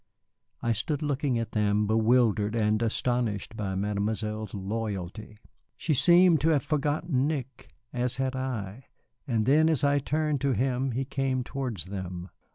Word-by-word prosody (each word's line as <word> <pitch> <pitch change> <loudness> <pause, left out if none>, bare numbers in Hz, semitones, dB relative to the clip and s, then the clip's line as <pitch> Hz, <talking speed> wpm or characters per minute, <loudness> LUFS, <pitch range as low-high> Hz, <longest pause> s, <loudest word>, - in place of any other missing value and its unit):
I 120 - +1
stood 140 +7 -2
looking 140 -3 0
at 115 -1 -3
them, 105 -1 +1
bewildered 110 -1 +2
and 110 -1 +1
astonished 115 -2 -1
by 100 -3 -3
Mademoiselle's 105 +1 -2
loyalty. 105 0 -5 0.4
She 160 - 0
seemed 170 +3 +5
to 160 - +3
have 145 -5 +2
forgotten 145 -2 0
Nick, 135 -4 -5 0.2
as 125 0 -1
had 130 0 -1
I, 125 -3 -4 0.4
and 115 -4 +1
then 155 +5 +4
as 155 -4 +1
I 145 0 +3
turned 150 0 -1
to 140 -1 +2
him 130 +1 0
he 135 +3 -1
came 130 -1 -1
towards 125 -9 -4
them. 95 -2 -6
120 Hz, 150 wpm, -28 LUFS, 105-135 Hz, 0.4 s, seemed